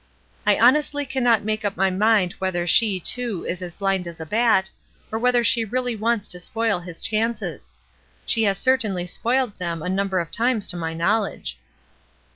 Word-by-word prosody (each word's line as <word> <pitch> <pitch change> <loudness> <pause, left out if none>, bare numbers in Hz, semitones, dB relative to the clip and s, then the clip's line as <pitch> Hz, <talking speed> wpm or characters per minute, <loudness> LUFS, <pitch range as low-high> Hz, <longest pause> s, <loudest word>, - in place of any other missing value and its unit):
I - - +5
honestly 290 +4 +3
cannot 245 -5 +2
make 215 +1 -2
up 205 -1 -2
my 190 0 +2
mind 205 -1 +2
whether 185 -2 -1
she, 195 +2 +4
too, 235 0 0
is 180 +1 -3
as 175 -1 -7
blind 195 -3 -1
as 170 -1 -9
a 160 - -6
bat, 210 0 +2 0.4
or 220 - -2
whether 245 0 +3
she 230 0 +4
really 245 +2 -2
wants 220 -1 -1
to 180 - -3
spoil 225 +1 -1
his 175 -1 -9
chances. 225 +1 -2 0.5
She 230 - +1
has 195 -1 +1
certainly 220 -9 +1
spoiled 240 +3 -1
them 170 -3 -3
a 180 - -3
number 190 0 0
of 170 -1 -4
times 230 -3 0
to 180 - +2
my 165 -1 -4
knowledge." 200 +5 -1
210 Hz, 180 wpm, -22 LUFS, 180-235 Hz, 0.5 s, I